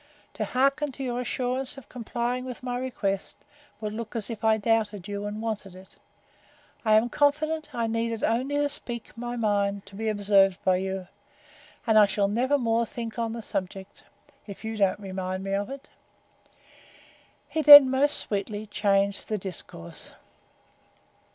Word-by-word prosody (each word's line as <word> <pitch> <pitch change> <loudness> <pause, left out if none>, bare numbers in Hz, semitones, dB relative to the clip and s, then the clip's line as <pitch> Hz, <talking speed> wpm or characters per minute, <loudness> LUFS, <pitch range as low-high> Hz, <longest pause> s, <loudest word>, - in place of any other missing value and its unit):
To 215 - -3
hearken 275 +5 +1
to 270 - -6
your 245 -1 -2
assurance 255 +2 -2
of 275 - -12
complying 245 +1 -3
with 255 -1 -8
my 245 -1 -3
request, 200 -7 -3 0.4
would 210 -1 -4
look 230 +1 -6
as 230 0 -1
if 225 0 -7
I 220 0 +4
doubted 215 -3 0
you, 205 0 -4
and 210 +2 -5
wanted 210 -4 -4
it. 185 +1 -14 0.9
I 215 -2 +4
am 220 +2 +4
confident 305 +4 0
I 235 -1 0
needed 230 0 -2
only 255 +6 0
to 290 0 +2
speak 240 -5 -7
my 240 +1 -5
mind, 200 -3 0
to 195 - -13
be 220 +2 -2
observed 200 -2 +3
by 185 -1 +3
you; 190 0 -4 0.8
and 220 -2 +5
I 210 - +7
shall 200 0 +1
never 250 +7 +1
more 230 -2 +1
think 235 -3 -6
on 225 -1 -1
the 230 -1 -6
subject, 190 0 -5 0.5
if 200 +2 -9
you 220 0 -3
don't 200 -1 +1
remind 185 -1 -4
me 195 0 -3
of 200 +3 -1
it. 275 0 -9 1.6
He 315 - -1
then 290 -2 +11
most 280 +2 +2
sweetly 205 +1 -3
changed 200 -1 0
the 215 - 0
discourse. 170 - -9
220 Hz, 165 wpm, -26 LUFS, 200-245 Hz, 1.6 s, then